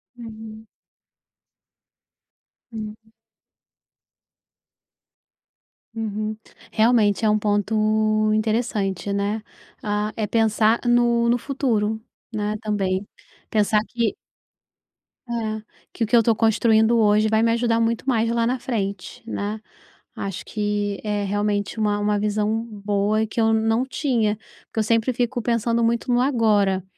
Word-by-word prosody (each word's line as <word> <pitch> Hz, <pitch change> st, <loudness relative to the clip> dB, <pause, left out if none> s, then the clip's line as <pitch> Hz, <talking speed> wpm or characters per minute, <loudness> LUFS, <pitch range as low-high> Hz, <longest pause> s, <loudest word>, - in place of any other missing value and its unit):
Hum. 220 Hz, -2 st, -10 dB, 2.0 s
Hum. 220 Hz, 0 st, -8 dB, 2.8 s
Uhum. 215 Hz, -1 st, -3 dB, 0.3 s
Realmente 220 Hz, -2 st, +3 dB
é -, -, +4 dB
um 210 Hz, 0 st, +3 dB
ponto 215 Hz, +1 st, +1 dB
interessante, 215 Hz, -3 st, -1 dB
né? 200 Hz, +2 st, -1 dB, 0.4 s
Ah, 210 Hz, 0 st, -1 dB
é 215 Hz, -2 st, -2 dB
pensar 220 Hz, +1 st, +2 dB
no 240 Hz, -1 st, +3 dB
no 240 Hz, -, +3 dB
futuro, 230 Hz, -5 st, -1 dB, 0.3 s
né, 210 Hz, 0 st, -1 dB
também. 200 Hz, -2 st, -1 dB, 0.4 s
Pensar 210 Hz, 0 st, +2 dB
que 235 Hz, -3 st, -1 dB, 1.1 s
É, 225 Hz, -3 st, -3 dB, 0.3 s
que 235 Hz, -, -2 dB
o -, -, 0 dB
que 240 Hz, -, +3 dB
eu -, -, +8 dB
estou 230 Hz, 0 st, +2 dB
construindo 220 Hz, +1 st, +3 dB
hoje 215 Hz, 0 st, +4 dB
vai 220 Hz, 0 st, +2 dB
me 230 Hz, -, +3 dB
ajudar 230 Hz, 0 st, +1 dB
muito 230 Hz, +3 st, -1 dB
mais 230 Hz, -3 st, +2 dB
lá 230 Hz, 0 st, +1 dB
na 255 Hz, +1 st, -1 dB
frente, 200 Hz, -7 st, -4 dB
né? 210 Hz, +1 st, -3 dB, 0.6 s
Acho 195 Hz, -2 st, -5 dB
que 205 Hz, -2 st, -2 dB
é 210 Hz, -1 st, -1 dB
realmente 205 Hz, +1 st, -1 dB
uma 210 Hz, -1 st, +1 dB
uma 205 Hz, 0 st, +1 dB
visão 210 Hz, +2 st, 0 dB
boa 205 Hz, 0 st, 0 dB
e -, -, -2 dB
que 220 Hz, -, -5 dB
eu 225 Hz, 0 st, +3 dB
não 225 Hz, +3 st, +2 dB
tinha, 235 Hz, -6 st, 0 dB, 0.3 s
porque -, -, -5 dB
eu -, -, +3 dB
sempre 230 Hz, +3 st, +1 dB
fico 245 Hz, +1 st, -1 dB
pensando 235 Hz, 0 st, +1 dB
muito 235 Hz, +2 st, 0 dB
no 245 Hz, -, +3 dB
agora, 210 Hz, -7 st, +2 dB
220 Hz, 125 wpm, -23 LUFS, 210-230 Hz, 2.8 s, eu